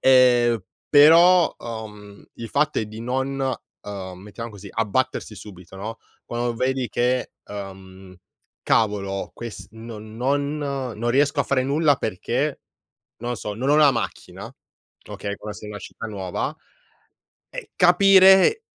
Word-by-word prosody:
Ehm, 120 -4 +4 0.3
però, 165 +4 +6
uhm, 105 -3 -9
il 115 - -8
fatto 150 +4 +1
è 110 - -2
di 110 +1 -9
non, 130 +3 -2 0.4
ehm, 95 -3 -7
mettiamo 105 +4 -8
così, 100 -1 -11
abbattersi 115 +1 -1
subito, 95 -2 -12
no, 110 +4 -6 0.3
quando 120 0 -2
vedi 130 +1 -1
che, 125 +1 0
ehm: 95 -2 -10 0.5
"Cavolo, 100 -3 0
ques 115 -2 -8
non 110 -1 -10
non 140 +4 0
non 130 -5 -3
riesco 140 +2 +2
a - - +3
fare 130 0 0
nulla 145 +2 +2
perché, - - -2 0.6
non 120 +1 -4
so, 105 -1 -5
non 125 +6 -3
ho 150 - +5
la 150 -2 +6
macchina", 120 - -5 0.6
okay, 100 0 -5
quando 105 0 -8
sei - - -10
in - - -7
una 105 - -7
città 115 - -8
nuova. 95 -4 -4 1.0
Eh, - - -8
capire 190 - +6
120 Hz, 135 wpm, -23 LUFS, 105-140 Hz, 1.0 s, però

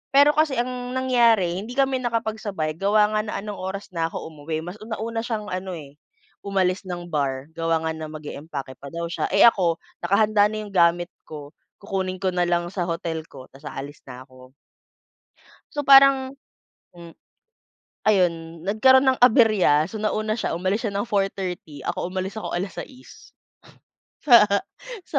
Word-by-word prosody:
"Pero 285 +1 +7
kasi 305 -2 +1
ang 250 0 -3
nangyari, 230 -9 +3
hindi 225 +5 -7
kami 270 -1 +2
nakapagsabay, 220 -9 -3
gawa 210 +1 +3
nga 215 - +2
na 210 - -5
anong 210 -2 -6
oras 190 +2 -5
na 165 -2 -1
ako 165 - -7
umuwi. 155 +1 -5
Mas 180 +4 -8
una 220 +1 -7
nauna 225 +1 -3
siyang 215 -3 -4
ano 185 0 -4
eh, 145 -3 -10 0.5
umalis 190 -1 0
ng 175 -1 -6
bar. 140 -2 -2
Gawa 165 -1 0
nga 160 0 -2
na 160 - -5
mag-eempake 145 -3 -7
pa 140 +1 -11
daw 170 0 -4
siya. 170 - -2
Eh 200 - +4
ako, 180 -7 +4 0.2
nakahanda 205 +2 +3
na 215 0 -4
yung 205 - -10
gamit 175 0 +3 0.2
ko, 150 -2 -9 0.3
kukunin 190 -2 -3
ko 190 - +1
nalang 175 -1 0
sa 180 -2 -3
hotel 165 -1 -4
ko, 130 -5 -13
tapos 140 +2 -17
aalis 145 +2 -8
na 125 -1 -10
ako. 130 -1 -17 1.2
So, 295 - -2
parang, 275 -1 +6 0.6
hmm 170 -1 -11 1.0
Ayon, 170 -4 0
nagkaroon 260 +7 +5
ng 260 - +3
aberya. 215 - +5
So 220 - -7
nauna 215 0 -1
siya, - - -2
umalis 190 +5 -1
siya 200 - -4
ng 200 - 0
4:30, 190 -6 -3
ako - - -2
umalis 190 +2 -4
ako - - -6
alas-sais 195 +8 -8 1.8
sa 285 - -1
185 Hz, 160 wpm, -23 LUFS, 165-220 Hz, 1.8 s, Pero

